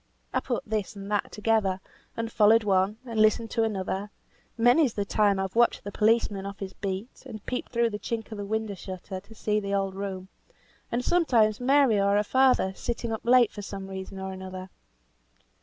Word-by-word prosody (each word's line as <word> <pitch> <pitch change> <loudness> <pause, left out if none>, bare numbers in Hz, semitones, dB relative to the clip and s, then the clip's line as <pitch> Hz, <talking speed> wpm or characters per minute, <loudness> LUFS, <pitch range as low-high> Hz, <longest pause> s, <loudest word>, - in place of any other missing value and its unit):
I - - +2
put - - -3
this 215 0 -3
and 200 0 -8
that 205 - 0
together, 210 -3 +1 0.4
and 230 0 -3
followed 220 +1 +5
one, 195 +1 +2
and 230 -3 -3
listened 215 +1 +3
to 230 - +1
the 220 -3 0
other; 190 +2 -3 0.5
many's 245 +3 +4
the 205 - -1
time 205 -1 +2
I've 190 +1 -3
watched 235 0 +3
the 205 - -6
policeman 215 -2 +2
off 200 0 -6
his 195 -1 -6
beat, 195 +4 -5
and 215 -2 -9
peeped 250 - -4
through 235 -1 +1
the 210 - -4
chink 225 0 -4
of 215 - -6
the - - -3
window 220 0 -2
shutter 185 0 -7
to 215 +4 -16
see 210 0 0
the 200 -1 -2
old 195 -1 -1
room, 190 -1 -5 0.6
and 245 +1 -1
sometimes 235 -12 +3
Mary 260 -4 +4
or 200 0 +3
her 205 - +3
father 255 -5 +3
sitting 235 +1 -3
up 220 - -3
late 245 -1 +5
for 205 - -7
some 195 -1 -7
reason 190 0 -7
or 190 0 -5
another. 185 0 -8
210 Hz, 200 wpm, -27 LUFS, 195-230 Hz, 0.6 s, followed